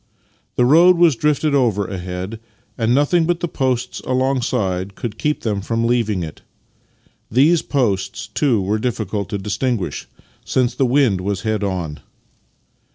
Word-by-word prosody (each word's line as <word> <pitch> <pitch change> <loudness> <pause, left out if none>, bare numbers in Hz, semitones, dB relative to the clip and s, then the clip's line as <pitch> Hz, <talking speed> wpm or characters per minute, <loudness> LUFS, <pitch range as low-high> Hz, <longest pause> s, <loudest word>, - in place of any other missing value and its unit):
The 125 - +3
road 170 +7 +6
was 170 -5 +5
drifted 150 +2 +1
over 115 -7 +2
ahead, 95 +3 -5 0.4
and 115 +1 +1
nothing 160 +4 +3
but 175 -1 +1
the 175 - -2
posts 130 -6 -2
alongside 115 -8 -1
could 115 -3 -6
keep 150 0 0
them 105 -3 -1
from 115 +3 -1
leaving 110 -6 +1
it. 80 - -8 0.9
These 150 +8 +4
posts, 100 - -1
too, 130 -7 +1
were 105 +3 0
diflicult 105 -4 -2
to 105 - -2
dis 105 +2 -4
tinguish, 120 -8 -2 0.4
since 125 -1 0
the 135 - +1
wind 120 -8 +2
was 95 0 -2
head 110 0 -1
on. 90 -6 -3
115 Hz, 150 wpm, -19 LUFS, 100-135 Hz, 0.9 s, road